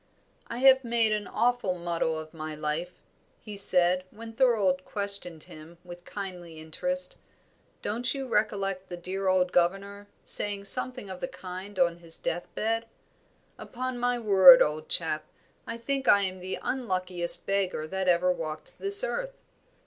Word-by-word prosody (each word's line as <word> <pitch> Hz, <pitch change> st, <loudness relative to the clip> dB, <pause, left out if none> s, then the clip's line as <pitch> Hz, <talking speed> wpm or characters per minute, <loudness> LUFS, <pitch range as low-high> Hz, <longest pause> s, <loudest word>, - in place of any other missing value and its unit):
"I 235 Hz, -, -6 dB
have 265 Hz, +1 st, +5 dB
made 230 Hz, -2 st, +1 dB
an 210 Hz, -1 st, -2 dB
awful 235 Hz, -5 st, 0 dB
muddle 170 Hz, -2 st, -2 dB
of 155 Hz, +1 st, -9 dB
my 155 Hz, -1 st, -6 dB
life," 155 Hz, +4 st, -4 dB, 0.4 s
he 210 Hz, -2 st, -9 dB
said, 180 Hz, -2 st, +3 dB
when 225 Hz, +2 st, -11 dB
Thorold 215 Hz, -7 st, +2 dB
questioned 200 Hz, -6 st, -4 dB
him 155 Hz, +2 st, -13 dB
with 175 Hz, 0 st, -12 dB
kindly 180 Hz, -5 st, -8 dB
interest. 270 Hz, -, -4 dB, 0.7 s
"Don't 240 Hz, +4 st, -2 dB
you 270 Hz, -1 st, -4 dB
recollect 195 Hz, -4 st, -1 dB
the 175 Hz, -, -6 dB
dear 190 Hz, +2 st, -4 dB
old 185 Hz, -1 st, +2 dB
governor 200 Hz, +3 st, -1 dB, 0.2 s
said 200 Hz, -1 st, +2 dB
something 255 Hz, -2 st, +4 dB
of 185 Hz, -, -8 dB
the -, -, -3 dB
kind 185 Hz, +2 st, -9 dB
on 170 Hz, -2 st, +2 dB
his 170 Hz, -1 st, -2 dB
death 170 Hz, +1 st, -4 dB
bed? 225 Hz, +1 st, -1 dB, 0.7 s
Upon 255 Hz, 0 st, -5 dB
my 245 Hz, 0 st, 0 dB
word, 220 Hz, +3 st, +8 dB
old 155 Hz, +1 st, -4 dB
chap, 155 Hz, -2 st, 0 dB, 0.4 s
I 230 Hz, -, -5 dB
think 270 Hz, +3 st, -3 dB
I 200 Hz, 0 st, +5 dB
am 185 Hz, -1 st, -4 dB
the 185 Hz, +1 st, -5 dB
unluckiest 185 Hz, -8 st, -2 dB
beggar 195 Hz, -5 st, -1 dB
that 190 Hz, +3 st, -4 dB
ever 180 Hz, +1 st, +3 dB
walked 155 Hz, -3 st, -7 dB
this 400 Hz, +3 st, +7 dB
earth. -, -, -4 dB
190 Hz, 155 wpm, -27 LUFS, 175-230 Hz, 0.7 s, word